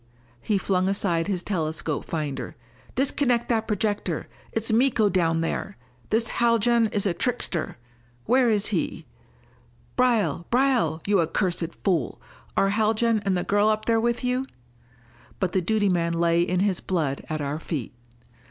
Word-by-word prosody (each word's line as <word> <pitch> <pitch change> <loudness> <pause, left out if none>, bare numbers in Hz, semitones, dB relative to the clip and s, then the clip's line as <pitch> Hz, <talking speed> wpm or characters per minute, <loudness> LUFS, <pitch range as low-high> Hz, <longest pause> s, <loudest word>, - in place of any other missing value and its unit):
He 210 - +1
flung 190 -1 +1
aside 180 -4 0
his 185 -3 -1
telescope 160 -5 -2
finder. 150 -4 -4 0.4
"Disconnect 250 -2 +1
that 225 -2 +1
projector! 210 -1 -1 0.2
It's 225 0 0
Miko 230 -3 +3
down 165 -4 +1
there! 190 +4 -3 0.3
This 225 +1 +2
Haljan 235 0 +3
is 205 -1 -1
a 190 - +1
trickster! 190 - -1 0.5
Where 250 0 +4
is 210 -2 +2
he? - - -2 0.9
Braile 215 - +1
Braile, 240 - +2
you 200 -1 +3
accursed 170 0 -1
fool! 170 - 0 0.4
Are 195 - +3
Haljan 220 +2 +2
and 190 -2 +2
the 175 - -1
girl 205 +1 +2
up 215 0 0
there 225 -1 +2
with 235 +1 0
you?" 250 +1 0 0.9
But 185 -3 0
the 190 - +1
duty 205 +3 +1
man 170 -2 +1
lay 170 0 +2
in 180 +1 0
his 195 -3 +1
blood 155 -7 -2
at 155 0 -2
our 145 +1 -3
feet. 150 -8 -5
200 Hz, 150 wpm, -25 LUFS, 170-225 Hz, 0.9 s, Where